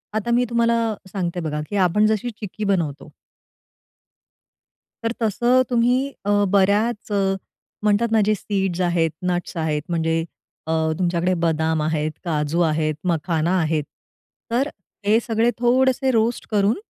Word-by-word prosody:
आता 220 +2 -1
मी 245 +1 +3
तुम्हाला 230 -1 +2 0.2
सांगते 180 -3 -2
बघा, 150 -2 -3
की 205 - -4
आपण 195 +2 +3
जशी 220 +2 0
चिक्की 210 0 -6
बनवतो 165 -8 -1 1.9
तर 230 - 0
तसं 240 +4 +3
तुम्ही, 245 +1 +3 0.3
अ, 205 0 +3
बऱ्याच 210 +3 +2
अ, - - +1 0.7
म्हणतात 215 +2 +2
ना, 220 -1 +4
जे 215 - +3
सीड्स 190 -3 -2
आहेत, 170 -3 +1 0.2
नट्स 175 +1 -3
आहेत, 155 -2 0
म्हणजे 165 -1 0 0.4
अ, - - -1 0.3
तुमच्याकडे 175 0 +1
बदाम 160 -1 +1
आहेत, 155 0 0
काजू 155 +1 0
आहेत, 155 -2 +1
मखाना 165 0 0
आहे. 155 -2 +1 0.7
तर 260 +5 +2 0.4
हे 215 +3 +4
सगळे 230 0 +1
थोडेसे 260 +2 +3
रोस्ट 230 +1 0
करून 205 0 +3
195 Hz, 135 wpm, -22 LUFS, 165-225 Hz, 1.9 s, ना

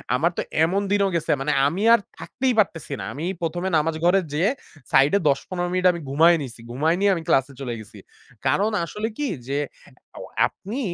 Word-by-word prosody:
আমার 170 +7 +2
তো - - +1 0.2
এমন 190 +5 +1
দিনও 200 -1 +3
গেছে 165 - 0
মানে 150 +2 0 0.2
আমি 175 +7 -2
আর 235 - +6 0.2
থাকতেই 255 -1 -1
পারতেছি 165 -8 0
না। - - -5
আমি 155 +5 -5 0.2
১ম 170 +1 -2
এ - - 0
নামাজ 155 +1 0
ঘরে 190 +2 +5
যেয়ে, 175 +8 +2 0.4
সাইডে 140 +9 +5
১০-১৫ 175 +5 -1
মিনিট 185 0 0
আমি 170 - -6
ঘুমায় 165 +5 +5
নিছি। 120 -4 -8
ঘুমায় 155 +7 +1
নিয়ে 200 0 +4
আমি 165 - -5
ক্লাসে 135 -3 +2
চলে 120 -3 -3
গেছি। 105 -1 -13 0.5
কারণ 200 +11 +2
আসলে 210 +5 -4
কি 295 -1 -1 0.2
যে 140 +1 -1 0.6
অ্যা - - -10 0.3
আপনি 220 +8 -7
170 Hz, 190 wpm, -23 LUFS, 145-195 Hz, 0.6 s, আর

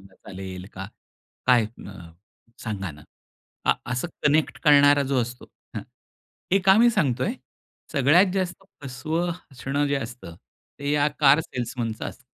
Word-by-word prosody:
चालेल 95 -2 -8
का? 95 0 -6 0.6
काय 120 -3 +5
अ, 95 -6 -11 0.5
सांगा 95 -5 -4
ना?" 75 0 -15 0.6
आ - - +5 0.2
असं 125 +7 -1 0.2
कनेक्ट 150 +1 +2
करणारा 145 -2 +6
जो 130 -2 +1
असतो 120 +2 -6 0.3
हं, - - -3 0.7
हे 195 - +5
का 190 +2 +7
मी 240 +1 +6
सांगतोय, 155 - 0 0.6
सगळ्यात 165 +7 +4
जास्त 185 -1 -2 0.2
फसवं 155 +7 -2
हसणं 145 -3 -3
जे 140 - 0
असतं, 120 -9 -6 0.4
ते 140 0 -1
या 145 0 +3
कार 145 0 +6
सेल्समनचं 120 -5 -4
असतं. - - -8
135 Hz, 135 wpm, -25 LUFS, 115-155 Hz, 0.7 s, का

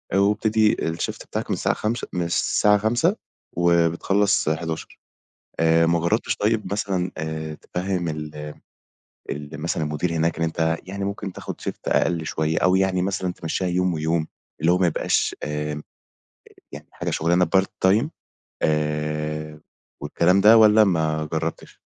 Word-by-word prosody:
ويبتدي 105 +2 +3
الshift 80 +1 -3
بتاعك - - -4
من - - +1
الساعة - - 0
17:00 115 +2 -2
من 90 - -1
الساعة 105 +4 +3
17:00 120 - +1 0.4
وبتخلّص 85 +3 +2
23:00 80 +1 -4 0.6
آآ، 80 0 +4
ما 85 0 +2
جرّبتش 105 +8 0
طيب 105 0 0
مثلًا 95 -3 -1
آآ، 80 0 -4
تفهّم 90 +2 -3
ال 75 -1 -5 1.0
ال 75 +2 -6
مثلًا 85 -1 -2
المدير 75 +3 -1
هناك 80 +1 0
إن 80 - +1
أنت 80 0 0
يعني 100 +1 -4
ممكن 100 -1 -4
تاخد - - -8
shift - - -5
أقل 85 -2 +1
شوية، 80 0 0
أو 90 +1 +3
يعني 95 -1 +1
مثلًا 95 -1 -1
تمشّيها 90 +2 -3
يوم، 90 0 +1
ويوم 80 0 0 0.3
اللي 80 +3 +3
هو 90 - +2
ما 90 - +3
يبقاش 85 - 0
آآ، 75 0 -3 0.9
يعني - - -10
حاجة - - -4
شغلانة 85 +3 +2
part 95 - +3 0.2
time 110 +9 +3 0.6
آآ، 75 0 -1 0.4
والكلام 85 +6 +2
ده 110 +3 +8
والَّا 110 0 +7
ما 80 -4 0
جرّبتش؟ 80 +1 -4
85 Hz, 145 wpm, -23 LUFS, 80-95 Hz, 1.0 s, ده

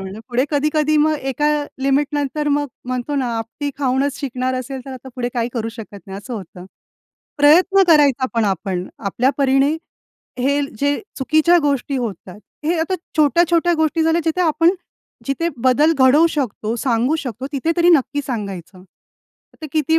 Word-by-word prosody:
म्हटलं. 190 +3 -7
पुढे 250 +1 +1
कधी-कधी 305 +1 +1
मग 310 +1 +3 0.2
एका 295 +3 -1 0.4
लिमिटनंतर 290 +1 0
मग 290 0 +1 0.2
म्हणतो 255 +3 -3
ना 270 -3 0
आपटी 230 +6 -5
खाऊनच 275 +1 0
शिकणार 255 -1 -2
असेल, 255 +1 -5
तर 270 - -9
आता 260 0 -10
पुढे 245 -1 -2
काही 235 -1 0
करू 225 -2 -3
शकत 225 -3 -9
नाही, 195 0 -7
असं 240 +5 -7
होतं. 185 -3 -9 0.7
प्रयत्न 360 +7 +5
करायचा 285 -5 +4
पण 230 -1 +2
आपण, 190 -2 -2
आपल्या 230 +6 0
परीने 275 +2 +3 0.7
हे 280 +2 +2 0.2
जे 285 +2 0 0.2
चुकीच्या 310 +5 +3
गोष्टी 280 -1 0
होत 225 -8 -4
आहेत, 185 +3 -11 0.2
हे 335 +2 +1
आता 330 +4 -1 0.2
छोट्या-छोट्या 340 +3 +3
गोष्टी 315 +1 +1
झाल्या, 325 +1 +2
जिथे 325 +2 0
आपण 330 0 +3 0.6
जिथे 275 +5 -1
बदल 285 +5 +4
घडवू 270 +5 +6
शकतो, 235 -7 -3
सांगू 245 +4 +1
शकतो, 260 -4 -5
तिथे 290 +4 0
तरी 345 0 +4
नक्की 290 -2 +2
सांगायचं. 195 -6 -6 0.8
तर - - -4
किती 315 +1 +2
275 Hz, 160 wpm, -19 LUFS, 240-305 Hz, 0.8 s, घडवू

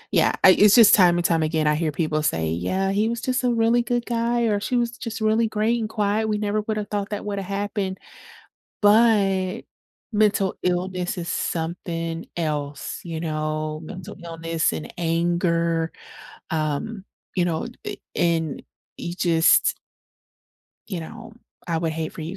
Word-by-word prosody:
Yeah. - - +4
I 190 - +10
it's 205 +2 +6
just 230 -4 +8
time 175 -3 +5
and 175 - -1
time 165 -2 +2
again, 155 0 0
I 150 - +4
hear 155 0 -1
people 155 -1 -1
say, 80 - 0
"Yeah, 185 - -1
he 210 +3 +1
was 235 - -3
just 255 0 -1
a 245 - +3
really 230 +1 +3
good 240 0 -1
guy, 235 0 0
or 210 -3 +1
she 250 - -1
was 235 -1 +1
just 225 -1 -5
really 220 +1 +2
great 220 +2 +1
and 220 - -2
quiet. 215 0 0
We 210 -1 0
never 210 0 -1
would 215 0 -3
have 210 - -4
thought 205 -1 -3
that 205 - -4
woulda 200 -1 -2
happened," 200 0 -3 0.8
but, 205 -3 +3 0.5
mental 205 -2 +2
illness 180 0 -1
is 170 -1 -4
something 165 -1 -3
else, 150 -3 -3
you 165 -2 -4
know? 155 -1 -2
Mental 185 +1 -8
illness 165 - -1
and 75 -1 -6
anger, 170 -1 +1 0.6
um, 160 +7 -2 0.3
you 180 - +3
know? 170 +6 -1 0.2
Eh, - - -4 0.2
and 165 -4 0 0.4
you 170 - -5
just 170 -2 +3 1.1
you 185 -5 -4
know? 225 +7 -10 0.4
I 165 -1 0
would 165 0 -1
hate 160 0 -4
for - - -9
you 165 +5 -5
180 Hz, 165 wpm, -23 LUFS, 165-215 Hz, 1.1 s, I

